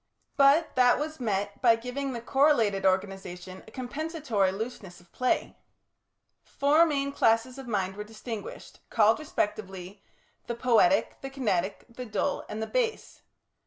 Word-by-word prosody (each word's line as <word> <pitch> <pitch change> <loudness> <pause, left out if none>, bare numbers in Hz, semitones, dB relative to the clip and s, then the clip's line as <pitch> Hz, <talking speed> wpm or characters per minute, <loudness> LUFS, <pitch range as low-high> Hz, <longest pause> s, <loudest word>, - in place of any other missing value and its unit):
But 285 +4 +4
that 250 -1 +5
was 310 +1 -4
met 205 -4 -2
by 235 -3 +6
giving 250 +4 -4
the 235 - -5
correlated 235 -8 +3
organisation 185 -1 -3
a - - -13
compensatory 260 - -1
looseness 195 -3 -7
of 175 0 -23
play. 255 0 -1 0.9
Four 300 +4 +3
main 280 -2 -1
classes 245 +1 +1
of 265 - -9
mind 195 -4 -1
were 210 - -5
distinguished, 220 0 -8
called, 220 +1 +4
respectively, 205 - -4 0.5
the 235 - -3
Poietic, 245 +4 +2
the 270 - -5
Kinetic, 210 -9 -2
the 250 +1 -9
Dull, 210 -1 -2
and 220 +1 -4
the - - -1
Base. 465 - -2
230 Hz, 140 wpm, -28 LUFS, 200-275 Hz, 0.9 s, by